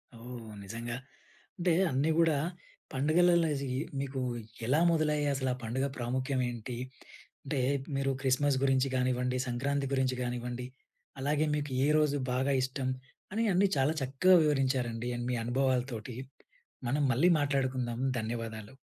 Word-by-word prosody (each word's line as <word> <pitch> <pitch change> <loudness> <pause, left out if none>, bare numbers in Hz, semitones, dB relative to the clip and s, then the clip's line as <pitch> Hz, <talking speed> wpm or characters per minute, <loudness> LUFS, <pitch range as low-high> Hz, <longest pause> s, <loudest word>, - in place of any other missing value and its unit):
ఓహ్! 115 -1 -9
నిజంగా 115 +4 -5 0.6
అంటే 175 0 +2 0.2
అన్నీ 135 +4 +1
గూడా 165 -3 +4 0.6
పండుగలలో 165 +4 +4 0.5
మీకు 135 -1 -3 0.5
ఎలా 135 +6 +3
మొదలయ్యాయి 150 -2 +1
అసలు 130 -1 -1
ఆ - - -4
పండుగ 125 +4 -1
ప్రాముఖ్యం 130 +2 -1
ఏంటి 120 0 -6 0.7
అంటే 140 0 -1 0.4
మీరు 135 0 +1
క్రిస్మస్ 135 +1 +2
గురించి 135 0 +3
గానివ్వండి, 125 0 +1
సంక్రాంతి 135 +3 -1
గురించి 130 -1 +1
గానివ్వండి, 125 0 -3 0.5
అలాగే 145 +3 +1
మీకు 145 -1 -3
ఏ - - +3
రోజు 150 -2 +2 0.2
బాగా 135 +2 +1
ఇష్టం. 130 0 -2 0.5
అని 225 +2 +1
అన్ని 190 +3 +4
చాలా 135 +3 +3
చక్కగా 135 +8 +4
వివరించారండి. 130 -5 0 0.2
మీ 125 - +1
అనుభవాలతోటి 125 -2 -1 0.7
మనం 145 +3 +1
మళ్ళీ 145 +9 +4
మాట్లాడుకుందాం. 130 -4 0 0.2
ధన్యవాదాలు. 110 0 -5
130 Hz, 125 wpm, -31 LUFS, 125-145 Hz, 0.7 s, గూడా